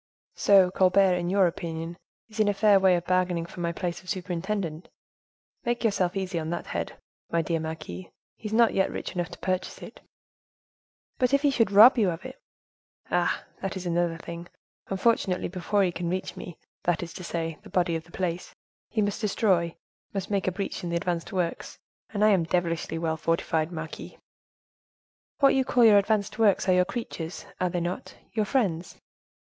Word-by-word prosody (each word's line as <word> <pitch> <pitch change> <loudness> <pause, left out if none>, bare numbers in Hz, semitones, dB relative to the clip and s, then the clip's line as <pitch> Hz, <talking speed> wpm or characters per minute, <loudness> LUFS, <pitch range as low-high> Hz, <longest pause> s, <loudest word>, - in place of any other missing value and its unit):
"So, 195 -3 +5
Colbert, 190 0 +4
in 175 -1 -1
your 195 0 +4
opinion, 165 -1 -3 0.3
is 220 -1 -11
in 215 - +4
a 205 - +2
fair 205 -1 +5
way 190 -1 +5
of 175 0 -2
bargaining 180 -2 +1
for 175 - -11
my 170 -1 0
place 175 0 -4
of 185 - -13
superintendent. 180 -2 -3 0.7
Make 240 0 -1
yourself 195 -4 +1
easy 185 -3 -2
on 160 0 -4
that 175 0 -3
head, - - -4 0.3
my 165 0 +1
dear 165 0 -1
marquise; 155 - -6 0.3
he 215 - -7
is - - -7
not 230 0 +5
yet 190 - +2
rich - - -5
enough 175 -2 -2
to 175 - -10
purchase 185 0 -3
it." - - -11 1.2
"But 255 +2 +3
if 280 - 0
he 290 - +4
should 230 -6 +2
rob 225 +6 +8
you 205 -4 +3
of 165 +4 -5
it?" 260 - -9 0.7
"Ah! - - +1 0.2
that 195 0 -3
is 185 - -6
another 170 -1 0
thing. 170 +1 -8 0.4
Unfortunately, 195 -2 +1
before 190 +3 0
he 180 - +1
can 175 0 -3
reach 185 +1 -3
me, 175 - -8 0.2
that 175 0 0
is 170 - -8
to 185 - -8
say, 165 -2 -3
the 210 - -14
body 175 -2 +1
of 160 0 -4
the 170 - -19
place, 180 -1 -3 0.3
he 215 - 0
must 205 +2 -2
destroy, 190 -6 +1 0.4
must 195 +1 -3
make 195 -2 0
a - - +3
breach 195 +1 -4
in 175 - -3
the 170 - -1
advanced 170 -2 -2
works, 180 -3 -3 0.3
and 210 -1 +1
I - - +6
am 185 -5 +3
devilishly 170 -1 -1
well 160 -1 -1
fortified, 165 0 0
marquise." 160 -2 -7 1.2
"What 275 -1 +5
you 265 - +3
call 245 -2 +4
your 210 -2 +8
advanced 210 +1 -1
works 205 -3 +3
are 185 - +5
your 180 0 +4
creatures, 180 -9 -5
are 180 - +1
they 175 0 -2
not—your 210 +4 -4
friends?" 190 -8 -1
180 Hz, 190 wpm, -27 LUFS, 170-205 Hz, 1.2 s, rob